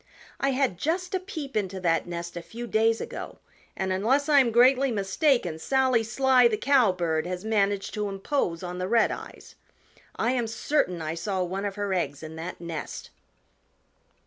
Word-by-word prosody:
I 275 - +1
had 260 -9 0
just 360 +4 -1
a 375 - +1
peep 315 -7 -7
into 195 -3 -1
that 165 -2 +1
nest 170 0 -5
a 175 - -4
few 235 +7 -8
days 225 0 +2
ago - - -7 0.4
and 190 0 -1
unless 255 +10 +1
I 295 -2 +6
am 255 -3 +4
greatly 255 +3 +5
mistaken 200 - +1
Sally 260 +3 +2
Sly 250 +2 +4
the 220 -2 -1
Cowbird 185 - +2
has 180 +2 -5
managed 200 -2 0
to 210 -2 -2
impose 195 - -2
on 180 0 -5
the 185 - -2
Redeyes. 230 +1 -1 0.6
I 230 - +1
am 245 -3 0
certain 220 - -1
I 155 0 -2
saw 190 +2 -2
one 190 +3 -3
of 200 -1 -3
her 205 -2 -2
eggs 145 -5 -2
in 160 0 -8
that 170 +3 -6
nest." 170 -3 -6
210 Hz, 170 wpm, -26 LUFS, 180-260 Hz, 0.6 s, I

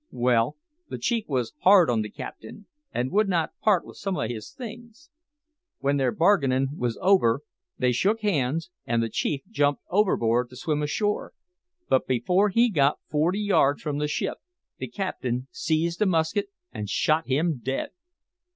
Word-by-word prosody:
Well, 120 -1 +1 0.3
the - - -4
chief 230 -3 -1
was 125 -5 -1
hard 190 -3 +6
on 115 -2 +1
the 105 - -4
captain, 110 - -9 0.3
and 125 +2 -2
would 210 0 +2
not 170 -4 0
part 200 -6 +3
with - - -13
some 195 -2 -3
o' - - -1
his 110 -4 -6
things. 240 +6 -10 0.7
When 140 +1 0
their 130 -3 +1
bargainin' 140 -6 +2
was 120 -5 -2
over 150 -10 +4 0.4
they 125 -1 +2
shook 200 - +1
hands, 165 - 0 0.2
and 115 0 +1
the 115 - -2
chief 135 +4 -1
jumped 145 0 0
overboard 125 - +2
to 125 - -13
swim 150 +1 -1
ashore; 205 +8 -1 0.5
but 130 - +2
before 180 - +2
he 230 +4 +3
got 145 -5 +3
forty 165 +7 +1
yards 145 -9 +2
from 145 -2 -2
the 150 - 0
ship, 150 - -2 0.4
the - - -4
captain 130 - -3
seized 170 - -1
a 210 - +4
musket 180 +4 +1 0.2
and 105 -3 -5
shot 155 +9 +1
him 150 +2 +1
dead. 135 +1 -2
150 Hz, 165 wpm, -26 LUFS, 125-195 Hz, 0.7 s, hard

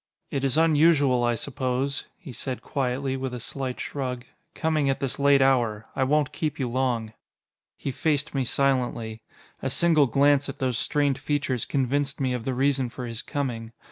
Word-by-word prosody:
It 140 - -2
is 135 +1 +2
unusual, 150 -5 +4
I 120 0 +2
suppose," 135 +2 -2
he 145 -8 -10
said 130 +1 -5
quietly, 135 0 -1
with 130 -1 -3
a - - -5
slight 130 +2 -4
shrug, 125 -3 -4 0.3
"coming 155 -3 +1
at 135 - 0
this 135 -1 -2
late 140 -1 +5
hour. 120 -5 +2
I 135 - +2
won't 150 +1 +2
keep 155 -2 -2
you 130 - -1
long." 120 -3 -1 0.6
He 135 - -3
faced 145 +2 0
me 135 -2 +1
silently. 120 -4 0 0.4
A - - -1
single 160 -5 +4
glance 140 +3 +3
at - - -6
those 125 -4 0
strained 145 -2 +1
features 145 -4 -1
convinced 140 +1 0
me 130 -2 0
of 120 -2 -4
the 130 - -1
reason 135 -1 +1
for 125 +2 -6
his 115 -1 -3
coming. 120 -6 -4
135 Hz, 175 wpm, -26 LUFS, 125-145 Hz, 0.6 s, late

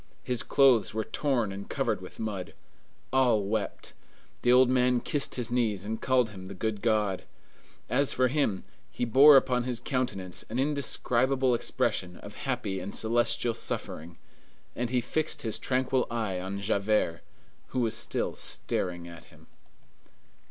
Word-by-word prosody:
His 125 -3 0
clothes 120 -7 +3
were 110 - 0
torn 120 -2 -1
and 100 +1 -8
covered - - -1
with - - -11
mud. 105 -5 -4 0.6
All 125 -5 +3
wept. 105 +1 -3 0.5
The 120 - +3
old 130 +1 +6
man 125 -1 +3
kissed 145 +3 -2
his 120 -1 -1
knees 110 -6 0
and 110 +1 -4
called 125 -4 +2
him 95 -2 -10
the 100 - -8
good 105 +1 -2
God. 105 -4 +1 0.6
As 140 -1 +2
for 130 0 +2
him, 125 -8 0 0.3
he 120 - -2
bore 135 +5 +8
upon 125 -2 +1
his 125 -2 -2
countenance 120 -9 -2
an 115 - -3
indescribable 130 -2 +1
expression 90 -6 -1
of 100 - -11
happy 120 -8 -3
and 100 - -5
celestial 115 +1 +1
suffering, 85 -6 -5 0.6
and 120 0 -2
he 125 0 +1
fixed 155 +6 -2
his 110 -1 -2
tranquil 130 0 0
eye 110 -6 -2
on 95 +2 -5
Javert, 100 -4 0 0.5
who 130 - -2
was 115 -2 0
still - - -2
staring 85 -1 -3
at 85 -1 -11
him. - - -19
115 Hz, 150 wpm, -28 LUFS, 100-130 Hz, 0.6 s, bore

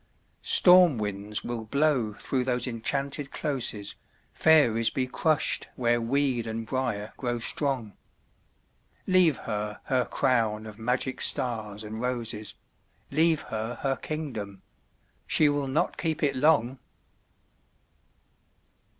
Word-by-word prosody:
Storm 180 -6 +6
winds 105 0 -3
will 120 -2 -4
blow 130 -2 +1
through 130 +4 -2
those 125 -1 0
enchanted 140 +4 -2
closes, 125 -10 -2 0.4
Fairies 120 -8 +4
be 130 - -1
crushed 155 +4 +1
where 120 -1 +1
weed 125 -1 0
and 110 0 -4
briar 115 -4 -3
grow 120 -2 -2
strong... 120 -3 -2 1.1
Leave 180 -6 +4
her 105 0 -4
her 130 -2 0
crown 110 -4 0
of 110 0 -10
magic 125 +3 -1
stars 110 -4 0
and 110 +1 -6
roses, 115 -4 -3 0.6
Leave 160 +2 +3
her 110 +2 -3
her 135 -1 +1
kingdom—she 105 - -3
will 145 -1 -1
not 135 +4 -1
keep 155 -2 -2
it 140 -2 +1
long! 130 -3 +2
125 Hz, 110 wpm, -27 LUFS, 110-140 Hz, 1.1 s, Storm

